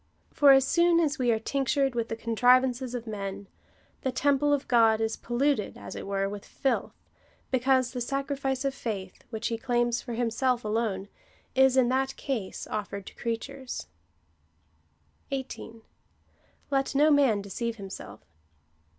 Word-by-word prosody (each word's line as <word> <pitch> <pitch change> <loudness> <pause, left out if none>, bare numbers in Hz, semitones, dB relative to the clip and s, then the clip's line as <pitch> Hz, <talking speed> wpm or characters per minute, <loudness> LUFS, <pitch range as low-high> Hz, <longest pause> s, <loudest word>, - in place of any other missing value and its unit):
For 285 -2 +7
as 270 -1 +6
soon 340 +3 +4
as 300 -3 +1
we 250 -1 +2
are 225 - +2
tinctured 270 +3 0
with 230 -1 -2
the 225 - -2
contrivances 250 +2 +2
of 240 -1 -5
men, 200 -2 -5 0.5
the 260 - -1
temple 285 +2 +2
of 285 -2 +1
God 225 -3 +4
is 225 0 0
polluted, 245 -2 0
as 100 -1 -8
it - - -6
were, 195 0 0
with 200 0 -6
filth, 270 - -2 0.6
because 260 0 +2
the 250 - -4
sacrifice 275 +1 -2
of 275 - 0
faith, 195 -7 -5
which 225 -1 -3
he 230 -1 -3
claims 240 -1 +1
for 240 - -6
himself 240 +1 0
alone, 210 -3 -1 0.5
is 265 0 +4
in 250 -2 +4
that 265 +1 0
case 230 -9 -4
oiFered 200 -2 -4
to - - -11
creatures. 255 +3 -4 1.4
18. 250 -4 -6 0.9
Let 270 0 0
no 300 +2 +5
man 265 -9 +4
deceive 230 +4 -3
himself. 195 - -9
245 Hz, 150 wpm, -28 LUFS, 220-270 Hz, 1.4 s, For